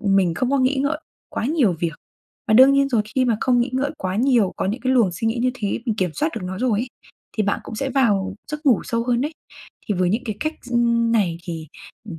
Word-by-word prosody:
mình 195 -4 +2
không 255 -1 -1
có 280 - +2
nghĩ 260 +2 +2
ngợi 300 +2 0 0.3
quá - - -3
nhiều 275 - +2
việc, 170 -2 0 0.6
và 215 - +4
đương 260 +3 +8
nhiên 275 0 +3
rồi 230 -5 +2
khi 255 - +4
mà 230 -3 +2
không 245 -2 +3
nghĩ 245 +1 0
ngợi 275 +2 0
quá 185 +1 -2
nhiều, 235 -5 +3
có - - -1
những 220 +6 -2
cái 260 +1 +1
luồng 230 -8 +4
suy 225 +6 -3
nghĩ 230 - -1
như 255 - +2
thế, 210 -2 -2
mình 220 - +1
kiểm 185 -4 0
soát 305 +2 0
được - - -4
nó 190 +1 -5
rồi 235 -4 +1
ấy, 250 - -4 0.5
thì 215 - +2
bạn 200 - 0
cũng - - -7
sẽ 270 +4 -2
vào 200 -8 +1
giấc 300 0 -6
ngủ 240 -7 +5
sâu 230 0 -1
hơn 240 -1 +1
đấy. 300 +4 -2 0.5
Thì 205 - 0
với 180 0 +1
những 235 +5 -1
cái 215 -3 -4
cách 310 +1 -1
s 250 - -12
ưm, 235 -1 +2
này 180 -7 +1
thì, 165 -3 -6 0.4
ừm, 170 -6 -8
235 Hz, 265 wpm, -22 LUFS, 195-260 Hz, 0.6 s, đương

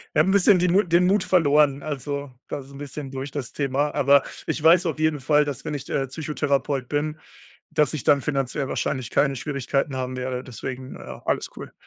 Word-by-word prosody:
Wir - - +4
haben - - +4
'n - - +3
bisschen 200 -1 +5
den 175 0 +2
Mu 200 - +6
den 175 0 +3
Mut 195 +1 +3
verloren. 150 -5 +3
Also, 140 -1 -4 0.2
das 140 - -5
ist 140 - -15
'n - - -10
bisschen 140 -1 -7
durch 135 +1 -5
das 140 -4 -5
Thema. 140 +1 0
Aber 140 +1 +5 0.2
ich - - -2
weiß 170 +3 +6
auf 155 - -3
jeden 155 -2 +1
Fall, 150 +2 +3
dass 140 -2 -5
wenn 150 - -4
ich, 140 -1 -5
äh, 135 - -1
Psychotherapeut 140 -2 -1
bin, 150 +1 -1 0.5
dass 150 +1 +2
ich 150 - -4
dann 145 -2 +5
finanziell 135 -1 -2
wahrscheinlich 130 -3 -2
keine 140 0 +2
Schwierigkeiten 135 0 -2
haben 130 0 -3
werde, 125 0 -3
deswegen, 130 +1 -7
äh, - - -9
alles - - 0
cool. - - -9
145 Hz, 210 wpm, -24 LUFS, 135-155 Hz, 0.5 s, Mu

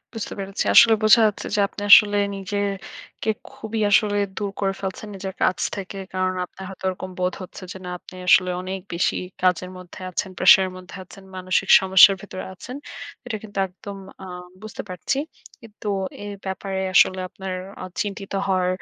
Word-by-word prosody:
বুঝতে 225 - -5
পেরেছি। 195 +1 -3
আসলে 235 -2 +9
বোঝা 215 +2 +7
যাচ্ছে 210 - -3
যে - - +2
আপনি 205 - -9
আসলে 205 -1 +9 0.2
নিজে 195 +1 -5 0.7
কে 220 - +1 0.2
খুবই 220 0 -5
আসলে 205 0 +4 0.2
দূর 205 -2 -2
করে 195 -1 +1
ফেলছেন 195 +2 -5
নিজের 190 0 -6
কাজ - - +2 0.2
থেকে। 195 0 -6 0.2
কারণ 185 0 0
আপনার 190 +1 -11
হয়তো 190 0 -11
ঐরকম 185 0 -5
বোধ 180 0 0
হচ্ছে 185 - -10
যে - - -10
না 180 - -5
আপনি - - -15
আসলে 185 -1 +6
অনেক 190 +1 -4
বেশি 170 - +1 0.3
কাজের 180 0 +1
মধ্যে 180 0 -12
আছেন, 185 +1 -3
pressure 190 - +7
এর - - -6
মধ্যে 185 +1 -11
আছেন, 195 +2 -14
মানসিক 185 +1 0
সমস্যার 190 +1 +7
ভেতরে 185 -2 -7
আছেন। 250 +8 -9 0.5
এইটা 235 -3 -3
কিন্তু 205 -2 -8
একদম 200 +2 -10 0.3
আ - - -8 0.4
বুঝতে 215 - -7
পারছি। 185 +9 -2 0.4
কিন্তু 215 -1 -13 0.4
এ - - -6 0.2
ব্যাপারে 190 0 -3
আসলে 185 0 +5
আপনার 190 +1 -7 0.3
আ - - -4 0.2
চিন্তিত 200 -1 -6
হওয়ার 185 -1 +1
195 Hz, 175 wpm, -23 LUFS, 185-205 Hz, 0.7 s, আসলে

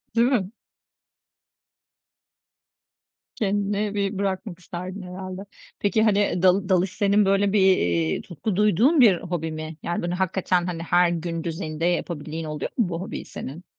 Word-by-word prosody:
Değil 235 +1 +4
mi? 215 -8 0 2.8
Kendini 205 0 -1
bir 200 -1 -1
bırakmak 190 -1 -3
isterdin 185 +1 -7
herhalde. 185 +1 -7 0.4
Peki, 210 +2 +2
hani, 205 -4 +2
dal 190 +1 +3
dalış 185 0 +2
senin 205 0 +3
böyle 195 +1 +2
bir, 210 - +4
iii, 85 - +2
tutku 190 +3 -4
duyduğun 215 - +4
bir 205 -7 +6
hobi 165 -2 -3
mi? 155 0 -6
Yani, 175 - -2
böyle, 175 0 -2
hakikaten 185 -1 0
hani 170 -2 -4
her 175 +1 +3
gün 165 -1 -3
düzeyinde 165 -1 -3
yapabildiğin 165 -2 -2
oluyor 150 -1 -4
mu 225 -8 +2
bu 170 0 -3
hobiyi 195 - -6
senin? 150 +7 -8
185 Hz, 145 wpm, -24 LUFS, 170-200 Hz, 2.8 s, bir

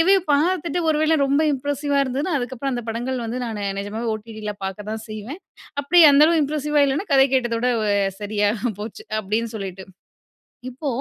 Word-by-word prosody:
Review 385 +4 +5
பார்த்துட்டு 340 +2 +1
ஒரு 300 - +1
வேளை 315 +1 +3
ரொம்ப 280 +3 +2
இம்ப்ரஸிவ்வா 285 +1 -1
இருந்ததுனா, 280 +6 -2
அதுக்கப்புறம் 260 +2 -3
அந்த 240 -2 -4
படங்கள் 245 +2 -3
வந்து, 240 +3 -4
நானு 210 -3 -4 0.2
நிஜமாவே 220 +3 -3
ஓடிடில 215 -1 -6
பாக்க 190 0 -4
தான் 220 0 -5
செய்வேன். 215 - -7 0.4
அப்டி 345 +5 +5
அந்த 285 +2 +6
அளவு 335 -1 +3
இம்ப்ரஸ்ஸிவ்வா 295 0 +1
இல்லன்னா, 295 +9 -2
கதை 270 0 +6
கேட்டத 240 -3 +1
விட 250 0 +2 0.5
சரியா 205 0 0 0.3
போச்சு. 215 +1 -7 0.2
அப்டின்னு 220 +3 -2
சொல்லிட்டு 190 -2 -7 0.8
இப்போ 265 +4 -7
255 Hz, 165 wpm, -22 LUFS, 220-290 Hz, 0.8 s, அந்த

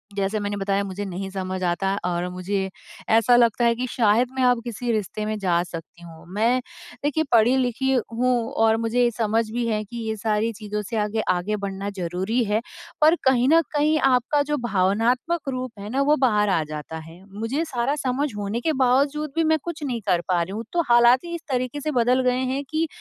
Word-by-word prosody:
जैसे 200 +2 -1
मैंने 205 0 -3
बताया 200 0 0
मुझे 195 +1 -5
नहीं 190 +1 -5
समझ 185 -1 -4
आता 175 +2 0
है 195 - 0
और 175 0 -1
मुझे 190 +1 -2 0.5
ऐसा 230 +2 +5
लगता 235 0 +3
है 235 - +4
कि 250 +2 -2
शायद 230 0 +2
मैं 260 - 0
अब 245 -2 +3
किसी 240 0 -3
रिश्ते 215 -1 -2
में 215 0 -2
जा 175 -3 +2
सकती 170 0 -10
हूँ। 165 -1 -13
मैं 230 +5 +2 0.4
देखिए, 295 +2 +1
पढ़ी-लिखी 250 +2 +3 0.2
हूँ 245 0 +1
और 225 0 +3
मुझे 235 +2 +2
समझ 225 0 +1
भी 240 +1 -1
है 215 -2 0
कि 235 +3 -9
ये 220 - -1
सारी 215 +1 0
चीज़ों 210 0 -4
से 230 - -2
आगे 210 +1 0
आगे 185 +4 -1
बढ़ना 200 -1 -4
ज़रूरी 185 +7 -1
है। 215 +1 0 0.4
पर 310 +2 +6
कहीं 255 -2 +3
न 330 +2 +6
कहीं 305 +1 +3
आपका 265 +2 +2
जो 295 +1 -1
भावनात्मक 240 - +1
रूप 255 -4 -5
है 205 +1 -7
ना 265 +4 0
वो 295 +2 +4
बाहर 210 -4 +2
आ 165 -5 +2
जाता 155 +1 -6
है, 165 +3 -13 0.2
मुझे 255 +8 -1
सारा 265 -2 -1
समझ 275 +1 -1
होने 205 +3 -3
के 315 +4 0
बावज़ूद 280 +3 +2
भी 330 - +2
मैं 315 0 +2
कुछ 335 -3 -6
नहीं 245 -5 -2
कर 175 -3 +2
पा 180 -2 +2
रही 170 +3 -3
हूँ। 220 +2 -4
तो 345 - +3
हालात 240 +1 +6
ही 340 0 -4
इस 335 - -6
तरीके 255 +3 -2
से 305 - -2
बदल 250 +2 +3
गए 250 0 0
हैं 275 +1 -2
कि 315 +1 0
230 Hz, 210 wpm, -23 LUFS, 200-255 Hz, 0.5 s, पर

